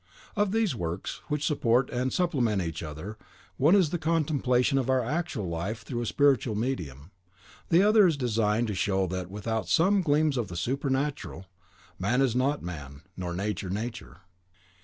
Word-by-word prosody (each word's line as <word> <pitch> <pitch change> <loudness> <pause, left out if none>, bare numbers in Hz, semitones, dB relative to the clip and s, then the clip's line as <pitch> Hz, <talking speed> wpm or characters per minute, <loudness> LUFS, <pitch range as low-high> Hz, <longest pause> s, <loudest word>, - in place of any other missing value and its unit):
Of 205 -2 +1
these 225 -5 +1
works, 90 -4 -4
which 150 -1 -1
support 130 -4 +2
and 125 +1 -1
supplement 130 - +1
each 80 -3 -3
other, 80 +7 -7 0.4
one 155 +8 +5
is 180 -7 +3
the 175 - -1
contemplation 145 -5 +1
of 130 -1 -2
our 130 -1 +3
actual 140 - -2
life 85 +7 -4
through 120 -3 -4
a 120 - -3
spiritual 135 -6 +2
medium, 85 - -4 0.6
the 170 +3 +5
other 210 -1 +6
is 160 -4 +1
designed 115 -3 +1
to - - -1
show 95 0 +1
that, 90 0 -4
without 105 -1 -3
some 190 - +4
gleams 150 -3 +2
of 120 -4 -1
the 85 - -7
supernatural, 135 - -2 0.5
man 115 +7 +1
is 130 -4 +2
not 140 +3 +1
man, 75 -4 -8
nor 90 -2 -4
nature 100 0 -3
nature. 115 +5 -5
120 Hz, 165 wpm, -28 LUFS, 95-145 Hz, 0.6 s, other